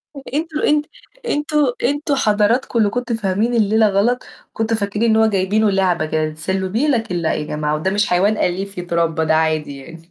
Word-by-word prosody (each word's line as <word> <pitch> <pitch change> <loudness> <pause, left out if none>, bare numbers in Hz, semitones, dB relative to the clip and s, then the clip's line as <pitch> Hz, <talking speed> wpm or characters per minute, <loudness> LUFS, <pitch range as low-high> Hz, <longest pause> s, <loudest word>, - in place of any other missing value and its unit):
طَب 275 - -8
أنتم 310 0 -2
أنت 300 0 +2 0.4
أنتم 300 -4 -1 0.3
أنتم 290 +3 0
حضراتكم 220 +2 +1
اللي 210 -2 +3
كنتم 245 0 -2
فاهمين 215 +3 -1
الليلة 220 -1 +3
غلط، 215 +6 +1 0.3
كنتوا 225 0 -1
فاكرين 210 +3 0
إن 220 - +3
هو 220 0 +4
جايبينه 205 +1 +1
لعبة 185 -4 +1
كده 155 0 -1
تتسلّوه 190 +5 -3
بيه، 240 +10 0
لكن 225 -9 0
لأ، 170 -2 0
يا - - -2
جماعة 150 0 -2
وده 155 +5 -1
مش 205 +1 +1
حيوان 195 +4 +2
أليف 195 +2 -2
يتربّى 170 -2 -1
ده 160 0 +2
عادي 155 -3 0
يعني. 165 +4 -13
200 Hz, 190 wpm, -19 LUFS, 170-230 Hz, 0.4 s, هو